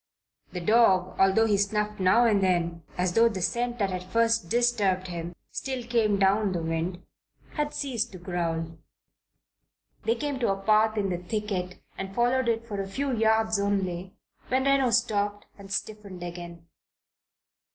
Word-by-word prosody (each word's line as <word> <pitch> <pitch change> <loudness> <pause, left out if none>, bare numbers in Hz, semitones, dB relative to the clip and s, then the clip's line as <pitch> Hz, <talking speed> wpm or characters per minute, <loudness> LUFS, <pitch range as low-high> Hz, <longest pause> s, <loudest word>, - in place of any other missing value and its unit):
The 180 - -5
dog, 190 -3 +3
although 195 +4 +4
he 210 -2 +2
snuffed 210 +1 -1
now 190 +6 +4
and 210 -4 +3
then 170 -2 0 0.2
as 180 0 0
though 230 +3 +5
the 205 -4 -4
scent 240 +6 -1
that 200 -4 0
had 185 -1 -4
first 230 0 +1
disturbed 205 -6 +1
him 170 0 -6 0.2
still 260 -2 -4
came 230 -4 +1
down 195 +1 +2
the 170 - -2
wind, 165 +2 -3 0.5
had 295 -1 -2
ceased 260 -6 -2
to - - -7
growl. 165 -2 -3 1.3
They 225 +1 +2
came 285 +1 -3
to 235 -5 +1
a 195 - -2
path 215 +2 +3
in 200 -2 0
the 175 - -2
thicket 185 -1 -4 0.2
and 195 0 -5
followed 245 +1 +2
it 230 0 -1
for 205 -3 -3
a 195 - -5
few 270 +4 -1
yards 220 -1 +2
only, 190 -2 -2 0.3
when 260 +1 +1
Reno 275 -2 +3
stopped 205 -4 0
and 195 -1 -13
stiffened 200 -2 -5
again. 170 -1 -8
205 Hz, 160 wpm, -27 LUFS, 185-230 Hz, 1.3 s, though